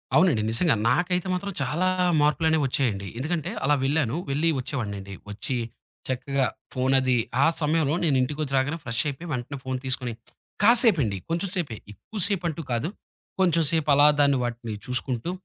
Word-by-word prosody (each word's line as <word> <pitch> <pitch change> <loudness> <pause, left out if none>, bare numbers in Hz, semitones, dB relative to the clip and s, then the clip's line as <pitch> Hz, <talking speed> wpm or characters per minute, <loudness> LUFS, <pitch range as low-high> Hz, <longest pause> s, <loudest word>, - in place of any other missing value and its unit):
అవునండి. 165 -12 +4
నిజంగా. 135 +5 +3
నాకైతే 180 +7 +1
మాత్రం 200 +2 -3
చాలా 150 +7 0 0.3
మార్పులనేవి 160 +1 +2
వచ్చాయండి. 115 -7 -1
ఎందుకంటే 160 +5 -2
అలా 145 +2 +3
వెళ్ళాను. 135 -3 +1
వెళ్లి 150 +4 +1
వచ్చేవాడినండి. 100 -7 -5 0.2
వచ్చి 105 +5 -3 0.5
చక్కగా 135 +1 -1 0.3
ఫోనది 130 0 +2 0.3
ఆ - - +5 0.2
సమయంలో 155 -1 +1
నేనింటికొచ్చి 140 -1 0
రాగానే 145 +5 0
ఫ్రెష్ 115 0 -1
అయిపోయి, 145 +4 -5
వెంటనే 125 +1 -4
ఫోన్ 130 0 -3
తీసుకొని, 125 -2 -2 0.5
కాసేపండి, 205 - +5
కొంచెం 170 +4 -1
సేపే 150 - -2 0.2
ఎక్కువ 215 - -9
సేపంటూ 170 -6 -2
కాదు. 120 +7 -1 0.5
కొంచెం 170 -3 +3
సేపలా 145 -3 +4
దాన్ని, 140 -1 +4
వాటిని 120 -2 -4
చూసుకుంటూ, 125 +4 -1
140 Hz, 135 wpm, -25 LUFS, 125-165 Hz, 0.5 s, ఆ